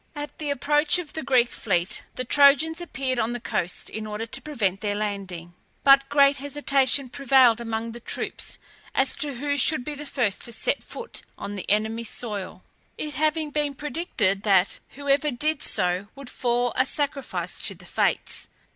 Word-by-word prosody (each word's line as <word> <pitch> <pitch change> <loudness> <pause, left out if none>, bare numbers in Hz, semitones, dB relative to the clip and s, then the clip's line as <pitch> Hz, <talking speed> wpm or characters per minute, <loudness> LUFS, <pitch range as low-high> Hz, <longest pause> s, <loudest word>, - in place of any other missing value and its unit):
At 295 0 -6
the 300 -2 -3
approach 295 +3 +3
of 340 -4 -6
the 315 - -3
Greek 255 -3 +3
fleet 180 -4 -1
the 255 - -3
Trojans 290 +5 +5
appeared 265 -7 -2
on 230 +1 0
the 245 - -3
coast 180 -5 -2
in 215 0 -5
order 210 +1 -4
to 230 - -4
prevent 210 -11 -1
their 205 -1 -1
landing. 195 -5 -4 0.3
But 275 0 +6
great 280 -1 +5
hesitation 275 -1 +1
prevailed 255 -3 +4
among 225 0 -3
the 235 - -9
troops - - -4 0.4
as 265 - +2
to 290 -3 -2
who 285 +3 -1
should 270 -1 +3
be 300 - -3
the 295 0 -7
first 235 -8 -1
to 235 - -5
set 225 - -1
foot 470 - -7 0.2
on 205 - -5
the 190 - -6
enemy's 220 +2 0
soil, 205 -5 -5 0.3
it 300 -1 -4
having 310 +2 0
been 290 -1 -1
predicted 265 - -1
that 195 -3 +3 0.2
whoever 285 +1 +2
did 295 +3 -1
so 180 +2 0
would 275 -2 -9
fall 245 0 0
a 255 - +4
sacrifice 280 0 -2
to - - 0
the - - -15
Fates. - - -1
260 Hz, 175 wpm, -25 LUFS, 220-290 Hz, 0.4 s, But